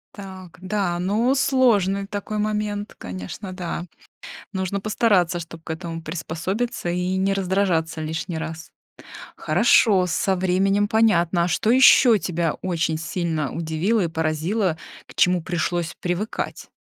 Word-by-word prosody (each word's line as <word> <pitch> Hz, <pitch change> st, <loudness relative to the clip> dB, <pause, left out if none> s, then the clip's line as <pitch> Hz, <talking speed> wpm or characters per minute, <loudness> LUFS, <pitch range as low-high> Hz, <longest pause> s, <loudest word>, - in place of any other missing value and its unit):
Так, 190 Hz, -5 st, -10 dB
да, 185 Hz, -2 st, -1 dB
ну 215 Hz, +8 st, +1 dB
сложный 215 Hz, -8 st, +2 dB
такой 205 Hz, +1 st, -5 dB
момент, 210 Hz, 0 st, -2 dB
конечно, 95 Hz, -, -7 dB
да. 175 Hz, -1 st, -4 dB, 0.7 s
Нужно 190 Hz, 0 st, -2 dB
постараться, 195 Hz, -5 st, +2 dB
чтоб 165 Hz, 0 st, -10 dB
к -, -, -9 dB
этому 165 Hz, 0 st, -5 dB
приспособиться 175 Hz, +6 st, -3 dB
и 180 Hz, +1 st, -1 dB
не 195 Hz, +1 st, +1 dB
раздражаться 180 Hz, -4 st, 0 dB
лишний 160 Hz, +2 st, -4 dB
раз. 160 Hz, 0 st, -7 dB, 0.7 s
Хорошо, 195 Hz, -6 st, +4 dB
со 190 Hz, +3 st, 0 dB
временем 190 Hz, +3 st, +2 dB
понятно. 190 Hz, -6 st, +2 dB
А -, -, 0 dB
что 180 Hz, +6 st, +1 dB
еще 250 Hz, -2 st, +7 dB
тебя 170 Hz, -4 st, -1 dB
очень 165 Hz, -3 st, -1 dB
сильно 165 Hz, -3 st, -2 dB
удивило 165 Hz, +7 st, 0 dB
и -, -, -1 dB
поразило, 160 Hz, +4 st, -1 dB, 0.3 s
к -, -, -15 dB
чему 180 Hz, -1 st, +3 dB
пришлось 175 Hz, 0 st, -2 dB
привыкать? 180 Hz, +5 st, -3 dB
185 Hz, 130 wpm, -23 LUFS, 165-205 Hz, 0.7 s, еще